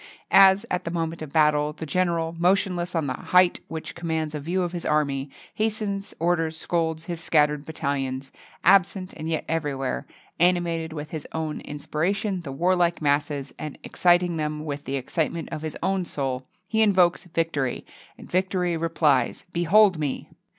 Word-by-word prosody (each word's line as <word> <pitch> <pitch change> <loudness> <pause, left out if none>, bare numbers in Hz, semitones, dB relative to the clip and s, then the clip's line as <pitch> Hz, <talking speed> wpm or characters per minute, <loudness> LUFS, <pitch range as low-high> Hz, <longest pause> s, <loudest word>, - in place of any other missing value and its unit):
As, 195 0 +7
at 180 - 0
the - - -3
moment 165 -1 -3
of 155 -3 -6
battle, 150 -1 +3
the 160 - -7
general, 165 0 0
motionless 180 -1 +1
on 160 -3 0
a 130 - -4
height 180 -1 +4
which 160 -1 -6
commands 160 -2 -2
a 150 - -3
view 175 +6 -1
of 175 - -2
his 175 -1 -5
army, 140 -2 0 0.2
hastens, 210 -2 -2
orders, 165 -1 0
scolds 160 -1 -1
his 170 -1 -5
scattered 150 -2 +2
battalions, 140 -3 -3 0.3
absent 190 0 +3
and 160 +1 -5
yet 160 -2 -1
everywhere, 140 - -2 0.3
animating 170 -2 +1
with 150 0 -6
his 155 -3 -6
own 160 -1 -3
inspiration 180 +7 -2
the 145 -5 -7
warlike 175 +3 +2
masses, 145 -1 0
and 150 -2 -6
exciting 175 -1 +2
them 150 0 -3
with 145 -1 -5
the 135 - -2
excitement 160 +5 -2
of 155 - -4
his 155 -1 -5
own 190 -1 +1
soul, 130 -4 -3 0.2
he 220 +1 +1
invokes 185 -4 +4
victory, 165 -6 -1 0.3
and - - -12
victory 180 -1 0
replies, 160 -2 +1
"Behold 185 +1 +4
me!" 145 -3 -3
165 Hz, 160 wpm, -25 LUFS, 150-180 Hz, 0.3 s, As